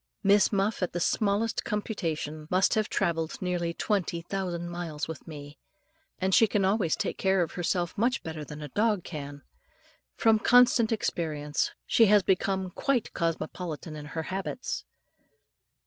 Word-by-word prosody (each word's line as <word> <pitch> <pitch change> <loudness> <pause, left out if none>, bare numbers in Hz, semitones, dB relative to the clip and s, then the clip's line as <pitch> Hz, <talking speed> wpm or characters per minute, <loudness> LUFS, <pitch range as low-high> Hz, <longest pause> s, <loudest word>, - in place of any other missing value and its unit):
Miss 200 0 +5
Muff, 200 +1 0
at 180 - -1
the 175 - -1
smallest 210 +4 +1
computation, 160 -8 -3
must 185 +1 +3
have 215 -1 +1
travelled 165 -4 -1
nearly 175 -2 -1
20,000 175 -1 -2
miles 165 -4 -4
with 160 0 -8
me; 145 -2 -9 0.6
and 190 0 0
she 225 - +6
can 200 -1 +1
always 190 -4 +2
take - - -3
care 190 -1 +3
of 165 - -5
herself 175 0 -1
much 240 +5 +1
better 160 -2 -5
than 150 +1 -8
a 150 - -6
dog 210 - +1
can. 145 -3 -7 0.7
From 225 -1 +4
constant 245 -1 +5
experience, 155 -8 -1 0.2
she 225 - +5
has 205 -1 +5
become 190 0 0
quite 255 +3 -1
cosmopolitan 165 -1 -3
in 150 -1 -7
her 160 +2 -4
habits. 195 +8 -4
180 Hz, 150 wpm, -28 LUFS, 160-205 Hz, 0.7 s, she